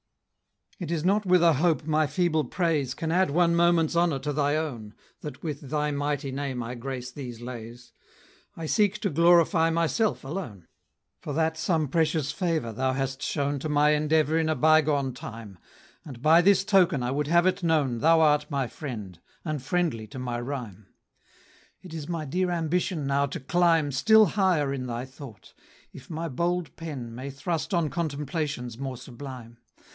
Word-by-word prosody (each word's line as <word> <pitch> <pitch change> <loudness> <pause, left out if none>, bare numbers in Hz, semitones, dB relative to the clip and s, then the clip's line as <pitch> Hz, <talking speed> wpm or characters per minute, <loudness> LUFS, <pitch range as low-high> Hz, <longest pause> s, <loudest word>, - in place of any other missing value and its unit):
It 175 -5 -5
is 165 -1 -2
not 200 +2 +2
with 180 -1 +5
a 165 -1 +6
hope 155 +1 +1
my 155 -1 +2
feeble 160 +1 +1
praise 150 -3 -1
Can 160 -1 -3
add 185 0 +3
one 170 +3 +3
moment's 170 -1 +3
honor 170 -4 +2
to 145 +2 -3
thy 145 0 +1
own, 120 -10 -4 0.2
That 145 -3 -8
with 150 -4 -5
thy 150 0 0
mighty 145 -1 -2
name 130 -2 -3
I 115 +2 -5
grace 125 0 -6
these 125 -4 -8
lays; 120 0 -9 0.6
I 165 - -5
seek 205 +4 +2
to 200 - -1
glorify 170 +1 +4
myself 170 +7 0
alone: 135 - -6 0.5
For 145 - -6
that 160 +1 +1
some 160 -1 0
precious 155 0 0
favor 160 - -1
thou 130 +3 0
hast 135 0 -3
shown 145 -1 -1
To 155 - -4
my 150 0 +4
endeavor 155 +1 +2
in 160 -1 0
a 155 - +1
bygone 150 -2 +3
time, 110 -6 -9 0.4
And 135 -6 -10
by 160 +6 +5
this 195 +1 +4
token 180 -10 +3
I 125 - -1
would 145 +1 -1
have 170 +2 +4
it 185 +1 +1
known 150 -8 +1
Thou 165 +5 +5
art 150 -1 +3
my 140 -3 -1
friend, 110 - -7 0.3
and 155 -4 -3
friendly 145 -6 -1
to 105 - -10
my 125 -2 -3
rhyme! 120 -7 -6 1.0
It 180 -3 -11
is 155 -1 -6
my 165 -3 -3
dear 180 +6 -1
ambition 170 -1 -1
now 140 +1 +1
to 155 +5 -6
climb 165 0 +2
Still 215 - +5
higher 180 -9 +1
in 130 -2 -4
thy 120 +1 -4
thought, 130 -6 -13 0.4
if - - -13
my 165 0 -4
bold 170 +4 -2
pen 140 -8 -7
May 130 +4 -6
thrust 150 +7 -3
on 170 -6 +1
contemplations 145 -5 -3
more 135 -2 -4
sublime. 125 -2 -10
150 Hz, 175 wpm, -26 LUFS, 130-165 Hz, 1.0 s, a